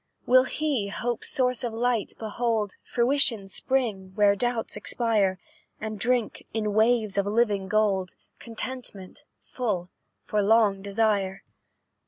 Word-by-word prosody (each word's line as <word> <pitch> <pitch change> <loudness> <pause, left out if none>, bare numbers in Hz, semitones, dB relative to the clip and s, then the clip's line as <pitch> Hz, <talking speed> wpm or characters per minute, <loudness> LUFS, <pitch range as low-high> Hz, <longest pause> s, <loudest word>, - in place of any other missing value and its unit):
"Will 255 +1 +6
he 280 -8 -1
hope's 235 +3 -3
source 255 -3 +1
of 240 - -1
light 235 -1 0
behold, 220 -1 -1
Fruition's 235 -6 +1
spring, 215 -8 -1
where 205 -1 +4
doubts 240 +1 -2
expire, 210 -6 0 0.4
And 215 -1 -5
drink, 245 -1 0
in 210 -2 -1
waves 220 -2 +2
of 200 - 0
living 205 -3 +1
gold, 195 -3 +1 0.2
Contentment, 230 -5 -7
full, 195 -8 -3 0.3
for 210 - 0
long 205 -2 +3
desire? 200 -1 0
220 Hz, 120 wpm, -26 LUFS, 200-240 Hz, 0.4 s, Will